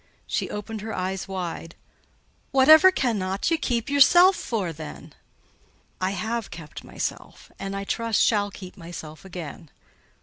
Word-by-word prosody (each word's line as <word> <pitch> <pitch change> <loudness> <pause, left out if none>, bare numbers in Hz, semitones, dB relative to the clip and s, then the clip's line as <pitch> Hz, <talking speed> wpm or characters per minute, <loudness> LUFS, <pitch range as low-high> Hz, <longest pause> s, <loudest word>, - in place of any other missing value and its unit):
She - - -2
opened 210 +1 -6
her 220 +1 -5
eyes 185 +1 -3
wide. 175 -3 -5 0.7
"Whatever 310 +6 +8
cannot 210 - -1
ye 330 - +3
keep 235 -7 -1
yourself 350 +7 +6
for, 200 - -3
then?" 155 -1 -10 0.9
"I 185 - +1
have 220 +3 -3
kept 155 -3 -10
myself; - - -6
and, 195 0 -4
I 195 - -3
trust, 230 +2 0
shall 205 -2 +2
keep 185 -2 -11
myself 160 -3 -9
again. 170 -3 -8
200 Hz, 135 wpm, -25 LUFS, 180-235 Hz, 0.9 s, Whatever